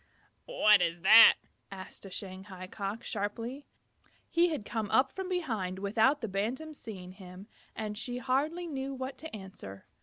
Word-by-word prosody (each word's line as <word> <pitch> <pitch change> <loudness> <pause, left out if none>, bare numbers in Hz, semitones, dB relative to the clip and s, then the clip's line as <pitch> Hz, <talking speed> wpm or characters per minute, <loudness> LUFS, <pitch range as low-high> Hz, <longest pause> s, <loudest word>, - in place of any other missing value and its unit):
"What 215 - +5
is 170 0 -1
that?" 215 +5 +9 0.4
asked 190 -1 -9
the 195 - -9
Shanghai 185 0 -7
Cock, 200 +3 -5
sharply. 230 +6 -4 0.6
He 345 +1 +4
had 295 -10 -4
come 220 -2 -3
up 265 0 +3
from 380 -1 -5
behind 225 - -2
without 220 +9 +2
the 225 - -2
Bantam's 245 +11 -3
seeing 185 -5 -8
him, 185 0 -11 0.3
and 210 -1 -4
she 245 +3 -3
hardly 285 +7 0
knew 275 -4 -4
what 260 +1 -6
to 320 -6 -7
answer. 190 - -10
220 Hz, 155 wpm, -31 LUFS, 195-270 Hz, 0.6 s, that